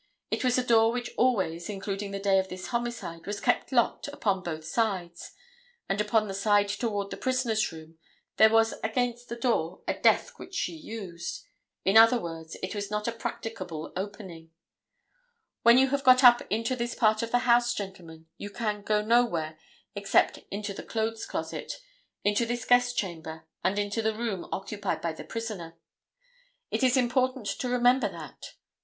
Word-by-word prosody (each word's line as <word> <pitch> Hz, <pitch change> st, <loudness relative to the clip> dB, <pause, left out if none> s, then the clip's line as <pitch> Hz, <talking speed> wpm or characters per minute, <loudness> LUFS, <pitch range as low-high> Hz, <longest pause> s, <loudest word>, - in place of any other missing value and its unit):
It -, -, -1 dB
was 250 Hz, -1 st, +3 dB
a 250 Hz, -, 0 dB
door 225 Hz, -2 st, +5 dB
which 245 Hz, 0 st, -4 dB
always, 185 Hz, -9 st, +1 dB
including 200 Hz, 0 st, -4 dB
the 200 Hz, -, -4 dB
day 195 Hz, -1 st, +3 dB
of 190 Hz, 0 st, -2 dB
this 185 Hz, 0 st, -7 dB
homicide, 235 Hz, -9 st, -4 dB
was 205 Hz, 0 st, -3 dB
kept -, -, +1 dB
locked 240 Hz, +1 st, +1 dB
upon 205 Hz, -9 st, -1 dB
both 160 Hz, -3 st, -5 dB
sides, 185 Hz, -4 st, -2 dB, 0.5 s
and 195 Hz, +2 st, 0 dB
upon 215 Hz, 0 st, +2 dB
the 195 Hz, -, -4 dB
side 205 Hz, +1 st, +2 dB
toward 205 Hz, -2 st, -2 dB
the -, -, -5 dB
prisoner's 250 Hz, -6 st, 0 dB
room 160 Hz, 0 st, -12 dB, 0.4 s
there 220 Hz, -, +8 dB
was 225 Hz, 0 st, +3 dB
against 240 Hz, +2 st, -1 dB
the 235 Hz, -, -4 dB
door 230 Hz, -8 st, -1 dB
a -, -, +1 dB
desk -, -, +2 dB
which 375 Hz, -, -10 dB
she 180 Hz, -, -1 dB
used. 175 Hz, -1 st, -7 dB, 0.4 s
In 195 Hz, +3 st, +5 dB
other 230 Hz, +2 st, +7 dB
words 165 Hz, -3 st, -7 dB
it 185 Hz, -, -3 dB
was 205 Hz, -1 st, -4 dB
not 210 Hz, +1 st, -2 dB
a -, -, +1 dB
practicable 185 Hz, -8 st, -6 dB
opening. 185 Hz, -4 st, -7 dB, 1.1 s
When 235 Hz, +1 st, +7 dB
you 265 Hz, +1 st, +5 dB
have 280 Hz, 0 st, -1 dB
got 255 Hz, +1 st, +6 dB
up 240 Hz, -1 st, +8 dB
into 230 Hz, +4 st, 0 dB
this 240 Hz, -1 st, -3 dB
part 215 Hz, -2 st, +3 dB
of 230 Hz, -, -3 dB
the 245 Hz, +1 st, +1 dB
house, 240 Hz, 0 st, +5 dB
gentlemen, 175 Hz, -5 st, -8 dB
you 205 Hz, -, -6 dB
can 210 Hz, -1 st, -3 dB
go 210 Hz, +1 st, +1 dB
nowhere 210 Hz, -10 st, +1 dB, 0.3 s
except 200 Hz, -1 st, +2 dB
into 200 Hz, 0 st, -4 dB
this -, -, -9 dB
clothes 225 Hz, 0 st, -2 dB
closet, -, -, -4 dB, 0.5 s
into 210 Hz, +3 st, +2 dB
this 240 Hz, 0 st, -3 dB
guest 245 Hz, 0 st, +3 dB
chamber 160 Hz, -4 st, -4 dB, 0.2 s
and 190 Hz, +2 st, +1 dB
into 205 Hz, +2 st, -1 dB
the 220 Hz, 0 st, 0 dB
room 220 Hz, -5 st, -3 dB
occupied 200 Hz, +1 st, -3 dB
by 165 Hz, -1 st, -2 dB
the -, -, -9 dB
prisoner. 210 Hz, -8 st, -6 dB, 1.0 s
It -, -, -1 dB
is 260 Hz, 0 st, +4 dB
important 255 Hz, -1 st, +1 dB
to 250 Hz, +5 st, -2 dB
remember 250 Hz, +1 st, +3 dB
that. -, -, -10 dB
215 Hz, 175 wpm, -28 LUFS, 190-240 Hz, 1.1 s, there